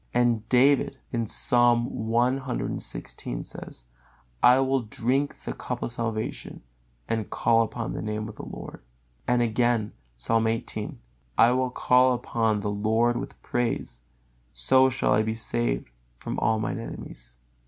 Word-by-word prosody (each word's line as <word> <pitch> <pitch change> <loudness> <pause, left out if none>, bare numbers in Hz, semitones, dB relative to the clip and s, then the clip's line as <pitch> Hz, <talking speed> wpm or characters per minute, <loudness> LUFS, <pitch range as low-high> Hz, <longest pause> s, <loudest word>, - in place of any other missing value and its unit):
And 120 -3 +2
David, 135 +2 +4 0.3
Psalm 120 +2 +3
cxvi: 120 - -3 0.6
"I 125 +1 +7
will 135 0 +2
drink 125 +5 -1
the - - -4
cup - - -5
of - - -3
salvation, 115 - -4 0.4
and 110 -2 -2
call 115 -1 +3
upon 115 +1 -3
the - - -4
Name 105 0 -3
of 110 - -9
the - - -7
Lord." - - -9 0.5
Again, 120 -2 +2 0.2
Psalm 115 - +1
xviii: 115 0 -3 0.4
"I 115 - +6
will 130 0 +1
call 125 +1 +4
upon 115 -3 0
the 105 - -2
Lord 110 +4 +1
with 125 - -6
praise: 115 - -2 0.5
so 130 - +4
shall 130 -3 +1
I 105 - +4
be 110 +1 -2
saved 120 - -1 0.3
from - - -4
all 110 0 +2
mine 110 +1 -2
enemies." - - -9
115 Hz, 130 wpm, -26 LUFS, 110-125 Hz, 0.6 s, I